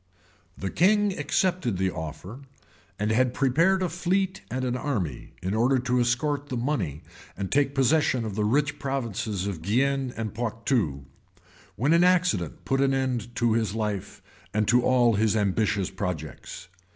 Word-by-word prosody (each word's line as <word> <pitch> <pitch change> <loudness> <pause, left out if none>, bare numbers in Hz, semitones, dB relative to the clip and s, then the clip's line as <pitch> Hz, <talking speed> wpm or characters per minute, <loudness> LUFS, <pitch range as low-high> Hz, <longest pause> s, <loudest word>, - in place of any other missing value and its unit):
] - - -34
The 95 - -4
king 205 +2 +3
accepted 145 - 0
the 95 0 0
offer; 80 - -7 0.6
and 105 +1 0
had 125 +2 +2
prepared 165 +8 +3
a 180 - 0
fleet 185 +3 -1
and 130 +2 -2
an 125 -1 -1
army, 105 - -3
in 95 +2 -1
order 120 +5 +3
to 125 0 0
escort 140 +4 0
the 125 - -2
money 120 - -2 0.3
and 95 -1 -4
take 140 0 +2
possession 135 -3 +2
of 110 - -4
the 105 +1 -1
rich 145 +6 +1
provinces 115 -8 -2
of 95 -6 -4
Guienne 130 +7 +1
and 110 -2 -3
Poictou; 110 - -1 0.7
when 140 +7 +2
an 170 +1 +5
accident 180 - +1
put 135 0 +1
an 135 -1 +3
end 125 -3 -2
to 120 -2 +2
his 110 -3 0
life, 105 -2 -3 0.3
and 105 -1 +1
to 125 0 +5
all 120 -2 +4
his 110 +1 +2
ambitious 100 -1 0
projects. 90 -6 -5
120 Hz, 165 wpm, -26 LUFS, 105-140 Hz, 0.7 s, an